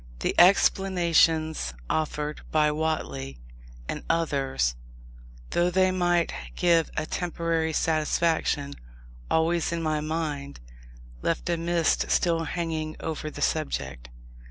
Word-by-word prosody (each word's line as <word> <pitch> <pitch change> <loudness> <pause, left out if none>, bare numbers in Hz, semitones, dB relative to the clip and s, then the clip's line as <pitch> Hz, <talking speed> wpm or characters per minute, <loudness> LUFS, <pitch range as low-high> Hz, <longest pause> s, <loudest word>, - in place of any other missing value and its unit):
The - - 0
explanations 170 - +3
offered 150 -1 -2
by 150 -1 +3
Whately 75 - -3 0.5
and - - -4
others, 135 - 0 0.8
though 175 +1 +2
they 185 +1 +3
might 175 -2 +1 0.2
give 170 -2 +3
a 155 - 0
temporary 165 -2 -1
satisfaction, 155 -2 0 0.6
always, 165 +1 +1
in 170 -1 -2
my 155 -1 0
mind, 150 - -3 0.6
left 165 - -1
a - - +2
mist 170 0 +1
still 165 -2 +2
hanging 160 -2 -3
over 155 -1 -4
the - - -5
subject. 60 - -2
160 Hz, 110 wpm, -26 LUFS, 150-170 Hz, 0.8 s, explanations